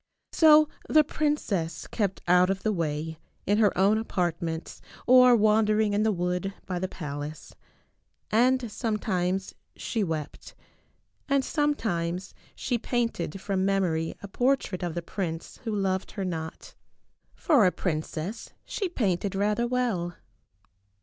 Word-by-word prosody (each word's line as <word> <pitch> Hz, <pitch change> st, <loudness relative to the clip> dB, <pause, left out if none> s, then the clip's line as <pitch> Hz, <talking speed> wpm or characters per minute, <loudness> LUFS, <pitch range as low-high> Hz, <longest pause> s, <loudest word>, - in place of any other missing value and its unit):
So 310 Hz, -1 st, +6 dB, 0.2 s
the 310 Hz, 0 st, +6 dB
princess 270 Hz, -, -1 dB
kept 200 Hz, -4 st, -2 dB
out 180 Hz, +1 st, +5 dB
of 195 Hz, 0 st, -2 dB
the 215 Hz, -, +1 dB
way, 160 Hz, -2 st, -3 dB, 0.3 s
in 205 Hz, +2 st, +2 dB
her 210 Hz, -2 st, +5 dB
own 200 Hz, +3 st, +4 dB
apartments 170 Hz, -6 st, -3 dB, 0.2 s
or 250 Hz, -1 st, +7 dB
wandering 215 Hz, -1 st, +3 dB
in 205 Hz, -, +2 dB
the 220 Hz, 0 st, +3 dB
wood 180 Hz, +1 st, -2 dB
by 180 Hz, -2 st, -3 dB
the 185 Hz, -, -1 dB
pal 145 Hz, -5 st, -6 dB
ace. 155 Hz, +1 st, -9 dB, 0.8 s
And 245 Hz, +1 st, +3 dB
sometimes 195 Hz, -4 st, -1 dB, 0.2 s
she 225 Hz, -, -2 dB
wept. 160 Hz, -5 st, -5 dB, 0.7 s
And 275 Hz, -1 st, +2 dB
sometimes 195 Hz, -, -1 dB, 0.2 s
she 240 Hz, -, -1 dB
painted 230 Hz, -8 st, -2 dB
from 190 Hz, -1 st, -1 dB
memory 180 Hz, -5 st, 0 dB
a -, -, -5 dB
portrait 245 Hz, -4 st, 0 dB
of 175 Hz, -2 st, -3 dB
the 175 Hz, -, -3 dB
prince 170 Hz, -2 st, -5 dB
who 225 Hz, -, -1 dB
loved 190 Hz, -1 st, -1 dB
her 195 Hz, -3 st, -3 dB
not. 160 Hz, -3 st, -5 dB, 0.6 s
For 275 Hz, -, +4 dB
a -, -, +3 dB
princess 160 Hz, +3 st, -4 dB
she 390 Hz, -4 st, -3 dB
painted 195 Hz, -, -1 dB
rather 210 Hz, +4 st, +1 dB
well. 225 Hz, -9 st, -1 dB
195 Hz, 135 wpm, -27 LUFS, 175-225 Hz, 0.8 s, or